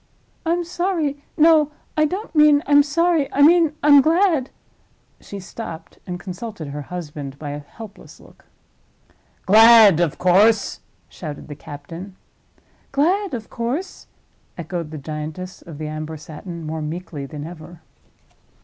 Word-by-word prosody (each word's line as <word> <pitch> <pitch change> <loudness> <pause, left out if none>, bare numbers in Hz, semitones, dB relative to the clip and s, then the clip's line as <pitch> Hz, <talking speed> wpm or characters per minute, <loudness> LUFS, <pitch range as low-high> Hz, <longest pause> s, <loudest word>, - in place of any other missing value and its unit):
I'm 345 +1 +1
sorry—no, 320 -3 +1 0.2
I 310 - +3
don't 380 +8 -4
mean 300 -1 +5
I'm 290 0 +6
sorry; 325 0 +1
I 285 - +3
mean 330 0 +5
I'm 290 -1 +8
glad—" 320 -3 +2 0.7
she 200 - -9
stopped, 175 -4 -9
and 180 -1 -5
consulted 185 -3 -7
her 145 +1 -6
husband 145 -4 -7
by 145 0 -6
a 145 - -5
helpless 205 +8 -13
look. - - -20 1.0
"Glad, 220 -3 +8
of 170 -4 0
course!" 200 +4 +3 0.3
shouted 155 -3 -9
the 145 - -7
captain. 165 +7 -10 0.8
"Glad, 355 +4 +1
of 220 -2 -8
course," 270 +11 -4 0.5
echoed 170 -1 -5
the 155 - -7
giantess 155 +5 -7
of 165 -4 -11
the 155 - -5
amber 155 +1 -6
satin, 165 +3 -9
more 160 +1 -4
meekly 155 -2 -6
than 145 +1 -7
ever. 165 0 -11
190 Hz, 130 wpm, -21 LUFS, -, 1.0 s, I'm